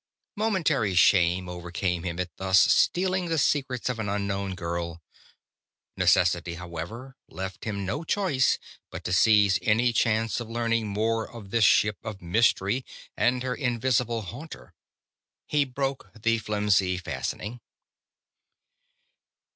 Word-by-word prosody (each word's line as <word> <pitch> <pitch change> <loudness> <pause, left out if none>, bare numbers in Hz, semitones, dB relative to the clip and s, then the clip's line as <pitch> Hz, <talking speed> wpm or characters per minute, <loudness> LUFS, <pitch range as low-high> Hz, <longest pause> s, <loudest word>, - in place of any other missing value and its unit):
Momentary 160 - +1
shame 90 0 +4
overcame 90 0 -3
him 85 0 -4
at 90 -4 -4
thus 95 -1 +4
stealing 185 0 +3
the 165 -1 0
secrets 135 -4 0
of 125 -3 -2
an 105 -2 -2
unknown 100 -1 -2
girl. 85 -1 -4 1.0
Necessity, 85 -1 +2
however, 90 +10 -7
left 95 0 -6
him 100 -3 -3
no 145 - -3
choice 165 -8 +1 0.3
but - - -8
to 90 - -2
seize 105 0 +5
any 115 +3 +2
chance 115 0 +1
of 120 -2 -7
learning 115 -1 0
more 110 +2 -1
of 105 -5 -11
this 115 -1 +4
ship 105 0 +4
of 110 -3 -6
mystery 100 +5 +1 0.3
and 125 +1 +1
her 130 -1 -1
invisible 120 -3 0
haunter. 130 - -10 0.7
He 145 -1 +1
broke 135 +1 -3
the 115 +1 +1
flimsy 105 -3 +1
fastening. 105 +5 -5
110 Hz, 125 wpm, -26 LUFS, 95-125 Hz, 1.0 s, seize